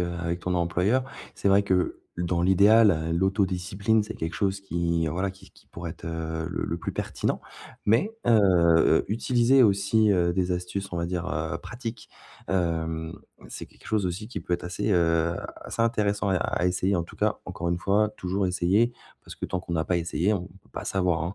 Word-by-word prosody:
heu, 85 0 -2
avec 85 +1 -2
ton 90 +1 -2
employeur. 90 +8 +1 0.3
C'est - - 0
vrai 100 +1 +5
que, 95 -2 0 0.2
dans 85 0 -1
l'idéal, 95 -3 +5
l'autodiscipline, 95 +3 +1
c'est 110 +2 -7
quelque 80 +1 -4
chose 100 0 -1
qui, 85 -2 -1
voilà, 95 +5 -1
qui 95 - -16
qui - - -23
pourrait 85 -1 -7
être, 80 - -10
heu, 80 -1 -3
le - - -3
le 85 - -2
plus - - -4
pertinent. - - -2 0.4
Mais, 115 - +3 0.2
heu - - +4
heu, 85 -6 +4
utiliser 120 +4 +3
aussi, 105 +1 +3
heu, 85 -2 +2
des 90 0 0
astuces, 90 +2 -3
on - - -2
va 85 - -1
dire, 90 0 -3
heu, 80 -1 -2
pratiques. 120 0 -7 0.4
Hem, 80 -3 -1 0.4
c'est - - -7
quelque - - -19
chose 105 -4 0
aussi 95 +5 -4
qui - - -5
peut 90 - -1
être - - -6
assez, 95 +4 -2
heu, 85 -1 +2 0.3
assez 115 - -2
intéressant 105 -3 +1
à 95 - +2
e - - +2
à 90 - 0
essayer, 90 +2 +1
en 85 - 0
tout - - -14
cas. - - 0
Encore 85 0 -4
une 85 - +1
fois, 100 +3 +2
toujours 95 +2 -1
essayer, 95 +7 +2 0.3
parce - - -10
que - - -7
tant 95 - -2
qu'on 85 -2 -4
a 80 - 0
pas 90 +3 +1
essayé, 85 +3 0
on 90 -3 -2 0.2
peut - - -27
pas - - -6
savoir, 90 -4 +1
hein. 85 +3 -3
90 Hz, 205 wpm, -26 LUFS, 85-100 Hz, 0.4 s, vrai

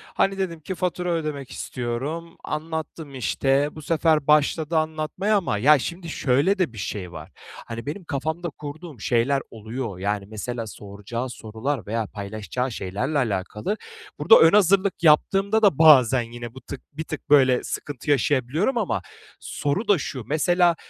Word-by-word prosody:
Hani, 195 0 +2
dedim 180 -4 -3
ki 185 +5 -5
fatura 180 0 -2
ödemek 150 -5 -3
istiyorum. 140 +8 -4
Anlattım, 155 -1 -5
işte. 135 +3 +1
Bu 155 - -8
sefer 155 -1 +1
başladı 150 +2 +3
anlatmaya 160 +7 0
ama, 175 - -1
ya, 145 +7 +5
şimdi, 170 +5 -5
şöyle 145 +7 +2
de 180 -10 0
bir - - -12
şey 95 -2 -5
var. - - -10 0.4
Hani, 115 0 -6
benim 155 +7 -5
kafamda 160 +3 -3
kurduğum 150 -1 -9
şeyler 125 +5 +1
oluyor. 110 -2 -6
Yani, 100 +1 -1
mesela 115 +2 -5
soracağı 105 +5 -6
sorular 115 +1 -4
veya 110 +1 -2
paylaşacağı 110 +5 -4
şeylerle 110 +9 -2
alakalı, 105 - -1 0.4
burada 225 - +7
ön 165 - +7
hazırlık 195 -1 +3
yaptığımda 195 +7 +4
da 200 -10 +4
bazen 130 -6 +7
yine 120 -1 -7
bu 130 - -11
tık 140 - -8
bir 160 - -4
tık 155 -1 -7
böyle 130 -3 +5
sıkıntı 145 0 -5
yaşayabiliyorum 145 - +1
ama 200 - 0 0.4
soru 165 +11 -2
da 205 - +5
şu, 135 -4 -5
mesela, 175 +3 +3
145 Hz, 150 wpm, -24 LUFS, 120-165 Hz, 0.4 s, burada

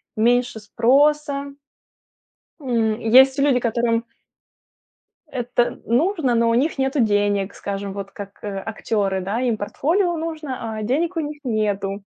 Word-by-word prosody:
меньше 240 +1 +2
спроса. 280 +5 +2 1.1
М, 230 -5 0
есть 265 +4 +5
люди, 275 -3 +3
которым 235 -1 0 1.2
это 245 -3 -1
нужно, 295 - +1
но 230 0 +3
у - - +2
них 285 +5 +1
нету 265 +1 0
денег, 205 -2 +1
скажем, 200 0 -5
вот 195 0 -7
как, 200 -1 -10
э, 205 -2 -4
актёры, 205 -2 -2
да, 200 +5 -2
им 240 -4 0
портфолио 340 - 0
нужно, 305 -8 -5
а 215 - -4
денег 325 +10 -1
у - - +2
них 295 -1 -5
нету. 205 -4 -1
240 Hz, 135 wpm, -21 LUFS, 210-280 Hz, 1.2 s, есть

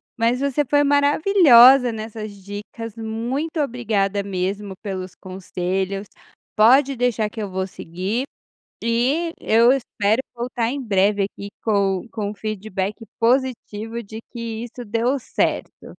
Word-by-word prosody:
mas 235 +2 +1
você 280 +1 +1
foi 290 +2 +3
maravilhosa 285 - +6
nessas 220 -1 -6
dicas. 205 +3 -8
Muito 240 +9 -3
obrigada 215 -7 0
mesmo 195 +1 -3
pelos 185 -2 -5
conselhos. 190 +1 -3 0.5
Pode 260 +5 +5
deixar 235 -3 +1
que 215 +1 -7
eu 205 - -4
vou 190 0 -2
seguir, 190 +7 -4 0.6
e 260 +9 +1
eu 230 +3 +4
espero 230 -3 +1
voltar 235 -1 -2
em 280 +1 -3
breve 200 -2 +2
aqui 200 0 -6 0.2
com 200 -2 +1
com 205 -3 -3
o - - -7
feedback 205 -2 -3 0.2
positivo 235 -2 0
de 220 +2 -9
que 230 -1 -5
isso 245 +1 -8
deu 230 +6 0
certo. - - -2
225 Hz, 130 wpm, -22 LUFS, 200-250 Hz, 0.6 s, maravilhosa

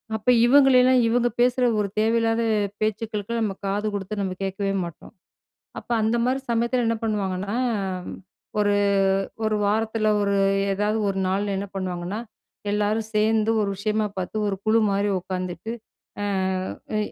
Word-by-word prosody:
அப்ப 215 - -7 0.2
இவங்களலாம் 255 -1 +6
இவங்க 240 +1 +2
பேசுற 250 +1 +3 0.2
ஒரு 205 - +1
தேவையில்லாத 225 +1 +2 0.4
பேச்சுக்களுக்குலாம், 215 +1 -2
நம்ம 205 -3 -1
காது 205 +2 -1
குடுத்து 205 +1 -4
நம்ம 190 -2 -2
கேட்கவே 195 +1 -2
மாட்டோம். 170 +3 -9 0.7
அப்ப - - -12
அந்த 220 +2 +2
மாரி 260 +2 +1
சமயத்தில 235 +1 +1
என்ன 230 0 +1
பண்ணுவாங்கன்னா, 200 -2 -2 1.0
ஒரு 205 -1 +3 0.7
ஒரு 215 0 +1
வாரத்தில 215 +1 +1
ஒரு 200 0 +1 0.4
ஏதாவது 210 +2 0
ஒரு 195 - -2
நாள்ல 200 +1 0
என்ன 200 +1 -4
பண்ணுவாங்கன்னா, 185 +1 -3 0.5
எல்லாரும் 210 +1 0
சேர்ந்து 220 +1 +3
ஒரு 200 - 0
விஷயமா 215 +2 0
பார்த்து 185 +3 -3
ஒரு 200 - -1
குழு 220 +1 +4
மாரி 200 +1 +1
உட்காந்துட்டு, 185 +2 -5 0.5
ஆ - - -1 0.7
அ - - +1
215 Hz, 135 wpm, -24 LUFS, 195-225 Hz, 1.0 s, இவங்களலாம்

